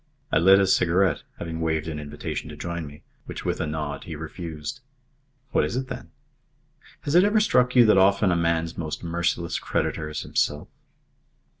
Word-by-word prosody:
I -, -, +4 dB
lit 95 Hz, +4 st, +7 dB
a 100 Hz, -, +4 dB
cigarette, 90 Hz, -2 st, +2 dB, 0.2 s
having 80 Hz, -1 st, -5 dB
waved 80 Hz, -1 st, 0 dB
an 75 Hz, -2 st, -4 dB
invitation 75 Hz, 0 st, -5 dB
to -, -, -8 dB
join 85 Hz, -2 st, -4 dB
me, 75 Hz, +1 st, -13 dB, 0.2 s
which -, -, -7 dB
with -, -, -1 dB
a 80 Hz, -, -1 dB
nod 75 Hz, -2 st, -4 dB
he 80 Hz, -, -6 dB
refused. 80 Hz, +6 st, -6 dB, 0.7 s
"What -, -, +3 dB
is -, -, -2 dB
it, 130 Hz, 0 st, -3 dB
then?" -, -, -7 dB, 0.9 s
"Has 145 Hz, -, -3 dB
it 175 Hz, +2 st, +7 dB
ever 210 Hz, +2 st, +4 dB
struck 125 Hz, -, +3 dB
you 120 Hz, -2 st, +8 dB
that 105 Hz, -3 st, +5 dB
often 100 Hz, 0 st, +4 dB
a -, -, +2 dB
man's 85 Hz, 0 st, 0 dB
most 80 Hz, 0 st, -4 dB
merciless 85 Hz, 0 st, -1 dB
creditor 75 Hz, -1 st, -2 dB
is 75 Hz, -, -4 dB
himself?" 75 Hz, 0 st, -1 dB
85 Hz, 180 wpm, -25 LUFS, 80-95 Hz, 0.9 s, you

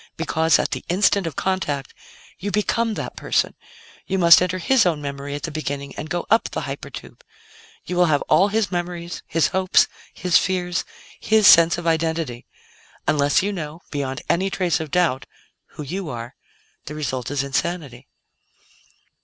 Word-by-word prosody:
Because, 160 Hz, -1 st, +2 dB
at -, -, -1 dB
the -, -, -4 dB
'instant' 190 Hz, 0 st, +2 dB
of 160 Hz, -, -5 dB
contact, 150 Hz, -8 st, -2 dB, 0.5 s
you 205 Hz, -, -3 dB
become 220 Hz, +2 st, 0 dB
that -, -, -5 dB
person; -, -, 0 dB, 0.5 s
you 190 Hz, -, 0 dB
must 170 Hz, -2 st, +7 dB
enter 180 Hz, 0 st, 0 dB
his 235 Hz, +7 st, +3 dB
own 170 Hz, -4 st, +1 dB
memory 140 Hz, 0 st, -5 dB
at 145 Hz, -, -7 dB
the 165 Hz, -, -3 dB
beginning 140 Hz, -2 st, -4 dB
and 155 Hz, -, -7 dB
go 175 Hz, -, -2 dB
up 225 Hz, -, +3 dB
the -, -, -4 dB
hyper -, -, -6 dB
tube. -, -, -11 dB, 0.6 s
You 180 Hz, -, -4 dB
will 180 Hz, -, +5 dB
have 145 Hz, -3 st, +2 dB
all 180 Hz, +6 st, +4 dB
his 210 Hz, 0 st, 0 dB
memories, 175 Hz, -1 st, -4 dB
his 165 Hz, -, +1 dB
hopes, 190 Hz, -1 st, +3 dB, 0.3 s
his 180 Hz, -1 st, +2 dB
fears, 180 Hz, -2 st, -1 dB, 0.3 s
his 215 Hz, -1 st, +3 dB
sense 170 Hz, -1 st, +7 dB
of 175 Hz, -, -6 dB
identity. 160 Hz, -6 st, -1 dB, 0.6 s
Unless 145 Hz, +3 st, +3 dB
you 205 Hz, +1 st, -1 dB
know 155 Hz, -3 st, -6 dB
beyond 140 Hz, +1 st, -3 dB
any 190 Hz, +3 st, +1 dB
trace 180 Hz, -3 st, 0 dB
of 160 Hz, -1 st, -5 dB
doubt 170 Hz, -7 st, +1 dB, 0.5 s
who 150 Hz, -, -6 dB
you 180 Hz, +4 st, -5 dB
are, 120 Hz, -1 st, -6 dB, 0.5 s
the 150 Hz, -, -7 dB
result 130 Hz, -5 st, -3 dB
is 140 Hz, -1 st, -1 dB
insanity." 140 Hz, -3 st, -3 dB
170 Hz, 170 wpm, -22 LUFS, 145-185 Hz, 0.6 s, must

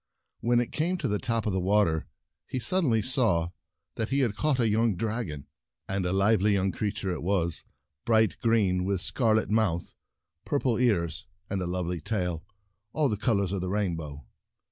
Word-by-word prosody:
When 120 Hz, 0 st, +2 dB
it 120 Hz, -, -1 dB
came 175 Hz, +4 st, 0 dB
to -, -, -2 dB
the 105 Hz, 0 st, 0 dB
top 115 Hz, -3 st, -1 dB
of 105 Hz, -, 0 dB
the 95 Hz, -, +1 dB
water, 95 Hz, -4 st, +2 dB, 0.4 s
he -, -, -3 dB
suddenly 125 Hz, -, +1 dB
saw 105 Hz, -11 st, +1 dB, 0.5 s
that 110 Hz, -1 st, -1 dB
he 140 Hz, +1 st, +2 dB
had 115 Hz, -5 st, +1 dB
caught 150 Hz, 0 st, +1 dB
a 115 Hz, -, +3 dB
young 110 Hz, 0 st, +2 dB
dragon. 105 Hz, -, -3 dB, 0.4 s
And 95 Hz, -2 st, -1 dB
a -, -, -1 dB
lively 100 Hz, +1 st, +3 dB
young 95 Hz, -1 st, +1 dB
creature 100 Hz, -2 st, -2 dB
it 90 Hz, -, -4 dB
was, 85 Hz, -3 st, 0 dB, 0.4 s
bright 110 Hz, -1 st, +3 dB
green, 100 Hz, -6 st, +2 dB
with 100 Hz, +1 st, 0 dB
a 90 Hz, -, -3 dB
scarlet 110 Hz, -4 st, +1 dB
mouth, 100 Hz, -6 st, +1 dB, 0.5 s
purple 130 Hz, -5 st, 0 dB
ears, 95 Hz, -10 st, 0 dB, 0.2 s
and 100 Hz, -2 st, -1 dB
a 90 Hz, -, -2 dB
love 90 Hz, 0 st, -2 dB
ly 90 Hz, 0 st, -3 dB
tail, 90 Hz, -2 st, -2 dB, 0.5 s
all 150 Hz, -3 st, +2 dB
the 105 Hz, -, 0 dB
colors 100 Hz, -3 st, +1 dB
of 100 Hz, -2 st, -2 dB
the 90 Hz, -, -3 dB
rain 100 Hz, -3 st, 0 dB
bow. 75 Hz, -4 st, -8 dB
105 Hz, 190 wpm, -28 LUFS, 90-115 Hz, 0.5 s, a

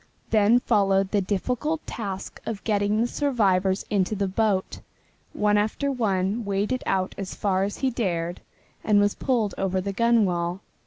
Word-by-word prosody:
Then 215 Hz, +2 st, +5 dB
followed 195 Hz, -5 st, +2 dB
the 205 Hz, -, +2 dB
difficult 250 Hz, -, -2 dB
task 195 Hz, -4 st, -6 dB
of 215 Hz, -3 st, -4 dB
getting 205 Hz, 0 st, +1 dB
the -, -, +3 dB
survivors 200 Hz, -9 st, +1 dB
into 200 Hz, 0 st, +1 dB
the 200 Hz, -1 st, -1 dB
boat. 195 Hz, -1 st, 0 dB, 0.5 s
One 210 Hz, 0 st, +2 dB
after 220 Hz, +7 st, -1 dB
one 210 Hz, -3 st, 0 dB
waded 205 Hz, +5 st, -1 dB
out 190 Hz, -1 st, 0 dB
as 195 Hz, -1 st, -5 dB
far 195 Hz, -2 st, 0 dB
as 200 Hz, -, -5 dB
he 265 Hz, -1 st, 0 dB
dared 175 Hz, -7 st, -2 dB, 0.4 s
and 210 Hz, -2 st, +4 dB
was 205 Hz, 0 st, +3 dB
pulled 235 Hz, -6 st, 0 dB
over 190 Hz, -1 st, 0 dB
the 195 Hz, +1 st, -3 dB
gunwale. 195 Hz, -6 st, +1 dB
205 Hz, 155 wpm, -25 LUFS, 190-225 Hz, 0.5 s, Then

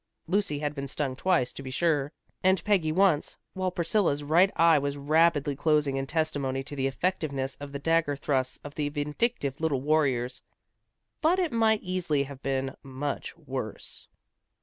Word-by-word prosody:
Lucy 180 Hz, -4 st, 0 dB
had 145 Hz, 0 st, -2 dB
been 140 Hz, -1 st, -5 dB
stung 135 Hz, -1 st, -2 dB
twice, 140 Hz, -5 st, +1 dB
to -, -, -8 dB
be 135 Hz, -, -7 dB
sure, 145 Hz, 0 st, +1 dB, 0.3 s
and 190 Hz, 0 st, +3 dB
Peggy 185 Hz, -7 st, +2 dB
once, 180 Hz, -3 st, +2 dB, 0.2 s
while 185 Hz, -1 st, -1 dB
Priscilla's 170 Hz, -4 st, +1 dB
right 170 Hz, +7 st, +4 dB
eye 165 Hz, -2 st, +5 dB
was 140 Hz, 0 st, -2 dB
rapidly 150 Hz, 0 st, +3 dB
closing 150 Hz, -1 st, +2 dB
in 135 Hz, 0 st, -2 dB
testimony 145 Hz, -4 st, -1 dB
to 145 Hz, -, -7 dB
the 135 Hz, -1 st, 0 dB
effectiveness 140 Hz, -3 st, -1 dB
of 145 Hz, -1 st, -7 dB
the 140 Hz, -, -4 dB
dagger 165 Hz, 0 st, +1 dB
thrusts 135 Hz, -2 st, -1 dB
of 145 Hz, -, -8 dB
the 145 Hz, -1 st, -1 dB
vindictive 145 Hz, -, -2 dB
little 155 Hz, -5 st, +1 dB
warriors. 130 Hz, -4 st, +1 dB, 0.8 s
But 325 Hz, +4 st, +3 dB
it 355 Hz, -5 st, 0 dB
might 220 Hz, -2 st, +2 dB
easily 175 Hz, -6 st, 0 dB
have 140 Hz, -1 st, -10 dB
been 135 Hz, 0 st, -2 dB
much 135 Hz, +1 st, -5 dB
worse. -, -, -6 dB
145 Hz, 165 wpm, -28 LUFS, 140-170 Hz, 0.8 s, eye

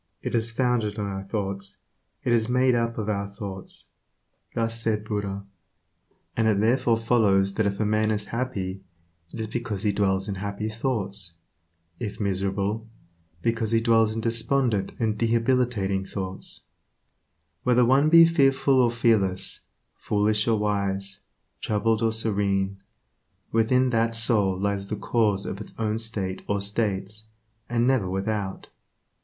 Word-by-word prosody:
It -, -, -3 dB
is 115 Hz, -1 st, +2 dB
founded 115 Hz, -3 st, 0 dB
on 105 Hz, -, -2 dB
our 95 Hz, -1 st, -4 dB
thoughts; 100 Hz, -1 st, -4 dB, 0.5 s
it 120 Hz, -, +2 dB
is 115 Hz, 0 st, +2 dB
made 125 Hz, +1 st, +3 dB
up 115 Hz, -1 st, 0 dB
of 110 Hz, -2 st, -3 dB
our 100 Hz, -1 st, -1 dB
thoughts." 100 Hz, -1 st, -8 dB, 0.7 s
Thus 115 Hz, 0 st, 0 dB
said 110 Hz, -2 st, 0 dB
Buddha, 100 Hz, -2 st, -3 dB, 0.9 s
and 110 Hz, -1 st, +2 dB
it 105 Hz, -2 st, +3 dB
therefore 115 Hz, +1 st, +3 dB
follows 105 Hz, -4 st, +2 dB
that 110 Hz, 0 st, +1 dB
if 100 Hz, 0 st, -3 dB
a 110 Hz, -, +1 dB
man 110 Hz, +1 st, +2 dB
is 105 Hz, -1 st, -1 dB
happy, 100 Hz, -7 st, -3 dB, 0.5 s
it -, -, -8 dB
is 110 Hz, -, -1 dB
because 110 Hz, -2 st, -4 dB
he 105 Hz, -, +2 dB
dwells 95 Hz, -1 st, 0 dB
in 100 Hz, -, -2 dB
happy 100 Hz, +1 st, -3 dB
thoughts; 100 Hz, -7 st, -3 dB, 0.6 s
if 105 Hz, -4 st, -5 dB
miserable, 100 Hz, +2 st, -1 dB, 0.5 s
because 115 Hz, -1 st, 0 dB
he 115 Hz, -, +5 dB
dwells 115 Hz, -1 st, +3 dB
in 115 Hz, -, -2 dB
despondent 115 Hz, -1 st, 0 dB
and 110 Hz, -2 st, -1 dB
debilitating 115 Hz, -4 st, +1 dB
thoughts, 95 Hz, -1 st, -6 dB, 1.0 s
Whether 125 Hz, -1 st, +4 dB
one 135 Hz, +5 st, +4 dB
be 165 Hz, +1 st, +9 dB
fearful 135 Hz, -4 st, +3 dB
or 120 Hz, -, +4 dB
fearless, 110 Hz, -6 st, +1 dB, 0.3 s
foolish 105 Hz, +1 st, +1 dB
or 115 Hz, -1 st, +3 dB
wise, 100 Hz, -1 st, -1 dB, 0.4 s
troubled 110 Hz, +1 st, 0 dB
or 115 Hz, -1 st, +2 dB
serene, 100 Hz, -3 st, 0 dB, 0.7 s
within 125 Hz, +3 st, +3 dB
that 115 Hz, 0 st, +1 dB
soul 105 Hz, -5 st, +3 dB
lies 100 Hz, 0 st, -1 dB
the 105 Hz, -, -3 dB
cause 105 Hz, -3 st, +1 dB
of 100 Hz, -, -5 dB
its -, -, -10 dB
own 110 Hz, 0 st, -1 dB
state 100 Hz, -5 st, -3 dB
or 100 Hz, 0 st, 0 dB
states, 105 Hz, 0 st, -2 dB, 0.4 s
and 120 Hz, 0 st, +1 dB
never 125 Hz, -8 st, +2 dB
without. 95 Hz, 0 st, -3 dB
110 Hz, 145 wpm, -25 LUFS, 100-115 Hz, 1.0 s, be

